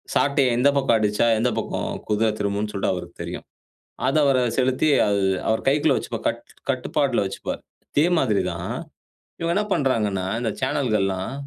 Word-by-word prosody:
சாட்டைய 140 -4 +3
எந்த 130 +3 +5
பக்கம் 135 -4 +3
அடிச்சா, 105 +2 +2
எந்த 125 +2 +2
பக்கம் - - -2 0.2
குதிர 110 +1 +2
திரும்பும்ன்னு 105 +1 -1
சொல்ட்டு 100 - 0
அவருக்கு 85 -1 -7
தெரியும். - - -6 0.6
அத 135 - +1
அவரு 135 -2 +3 0.2
செலுத்தி 130 +4 +2 0.2
அது 100 -1 +1 0.2
அவர் 110 0 0
கைக்குள்ள 150 +2 +3
வச்சுப்பார். - - -5
கட் - - -2 0.3
கட்டுப்பாட்ல - - 0
வைச்சுப்பார். - - -4 0.3
இதே 150 +4 +3
மாதிரி 110 -8 +2
தான். - - -5 0.7
இவங்க 170 +1 0
என்ன 210 - +2
பண்றாங்கன்னா, 105 -9 0
இந்த 120 - -1
சேனல்கள்லாம் 110 -8 0
115 Hz, 150 wpm, -23 LUFS, 105-135 Hz, 0.7 s, எந்த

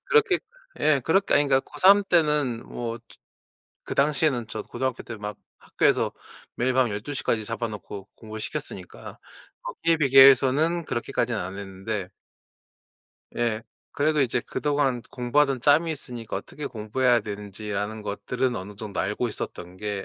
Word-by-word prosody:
그렇게 450 -6 +4 0.4
예. 150 -3 +4
그렇게 195 +5 +3
아니 145 0 +4
그러니까 135 -1 +4
고3 200 +2 +6
때는 150 -8 +2
뭐 115 -1 -5
즈 - - -27 0.8
그 - - -5
당시에는 140 -4 +2
저 115 - -5
고등학교 130 -2 -3
때 115 - -7
막 105 0 -5 0.2
학교에서 - - +1 0.4
매일 130 +2 +1
밤 130 -2 +3
12 105 +7 -5
시까지 115 -4 -1
잡아놓고 105 -3 -5
공부를 110 -1 -9
시켰으니까 - - -7 0.4
거기에 165 0 0
비교해서는 135 +4 +6
그렇게까지는 120 -2 -1
안 95 +2 -6
했는데 95 0 -5 1.3
예. 115 -2 0 0.3
그래도 150 +1 +1
이제 125 -1 0
그동안 140 -3 0
공부하던 135 +2 +1
짬이 150 +6 +4
있으니까 120 -6 -6
어떻게 150 - -6
공부해야 120 +2 +1
되는지라는 105 +1 -5
것들은 115 +5 -2
어느 100 +2 -7
정도 105 -2 -6
알고 105 +5 -1
있었던 90 -4 -6
게 105 0 -4
120 Hz, 340 characters per minute, -25 LUFS, 105-145 Hz, 1.3 s, 고3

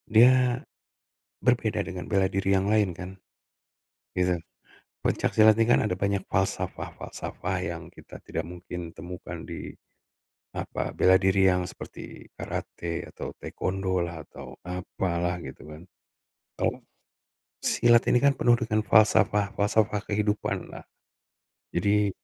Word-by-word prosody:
Dia 125 +2 +6 0.9
berbeda - - +2
dengan 90 -2 -6
bela 95 -3 +3
diri 95 0 +1
yang 95 +1 +1
lain 105 -3 +3
kan, 90 +1 -6 1.1
gitu. 90 -1 +1 0.7
Pencak - - +1
silat 110 0 +6
ini 115 - +4
kan - - +5
ada 90 -4 -1
banyak 100 0 0
falsafah-falsafah 95 -1 -3
yang - - -4
kita - - -13
tidak - - -4
mungkin 85 -1 -7
temukan 90 0 -8
di, - - -7 0.8
apa, - - -3
bela 95 0 +5
diri 95 0 +4
yang 90 0 +1
seperti - - -10
karate, 85 -1 -4
atau - - -6
taekwondo 95 -1 -1
lah, 85 -2 -6
atau 65 -2 -10
apalah 90 0 -2
gitu 65 - -9
kan. 75 +2 -10 0.8
Kalau - - -1 0.8
silat 120 0 +4
ini 125 - +5
kan 140 - +6
penuh 120 -1 +4
dengan 110 -2 0
falsafah-falsafah 105 0 +3
kehidupanlah. 105 0 -2 0.9
Jadi 100 +3 +2
95 Hz, 120 wpm, -27 LUFS, 90-105 Hz, 1.1 s, Dia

